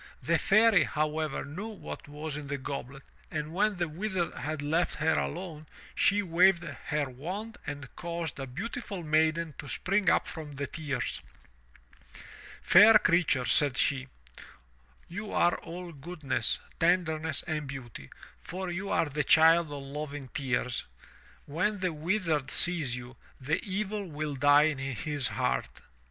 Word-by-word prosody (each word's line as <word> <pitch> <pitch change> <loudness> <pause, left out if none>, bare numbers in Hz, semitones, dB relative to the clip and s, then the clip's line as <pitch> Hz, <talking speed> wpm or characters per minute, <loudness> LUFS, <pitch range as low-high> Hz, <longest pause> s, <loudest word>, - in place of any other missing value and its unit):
The - - +2
Fairy, 215 0 +5
however, 155 0 -2
knew 170 +10 -6
what 215 -8 -8
was 150 +1 -6
in 150 -1 -6
the 140 0 -2
goblet, 135 0 -6 0.3
and 155 0 -4
when 205 +3 +2
the 175 -1 -1
Wizard 180 +2 -2
had 150 +2 -4
left 160 +4 0
her 160 +1 +1
alone, 160 -3 -4 0.3
she 205 +1 +3
waved 175 0 +4
her 150 -3 -3
wand 185 - -6
and 145 -2 -5
caused 170 -4 -4
a 135 - -4
beautiful 195 - -5
maiden 160 +1 +1
to 145 - -7
spring 195 -1 +1
up - - +3
from 155 -3 -7
the 140 +1 -3
tears. 140 - -3 1.4
"Fair 210 +4 +8
creature," 170 -9 +2
said 140 -2 +5
she, 135 -2 +1 1.0
''you 205 +4 -6
are 175 0 +3
all 175 +1 -8
goodness, 140 -6 -2 0.2
tenderness 165 -2 +1
and 155 -3 -3
beauty, 120 - -8 0.3
for 185 0 -5
you 190 +3 -4
are - - +2
the 150 +1 -1
child 160 +2 +5
of 140 -1 -6
loving 145 -1 -6
tears. 125 -2 -2 0.6
When 180 +8 -1
the 185 -3 -1
Wizard 160 -3 0
sees 160 -8 +3
you, 125 +1 -9 0.2
the 145 +5 -1
evil 205 0 -3
will 150 -1 -4
die 145 +2 +6
in 155 -3 0
his 135 +1 0
heart." - - -2
155 Hz, 145 wpm, -29 LUFS, 145-180 Hz, 1.4 s, Fair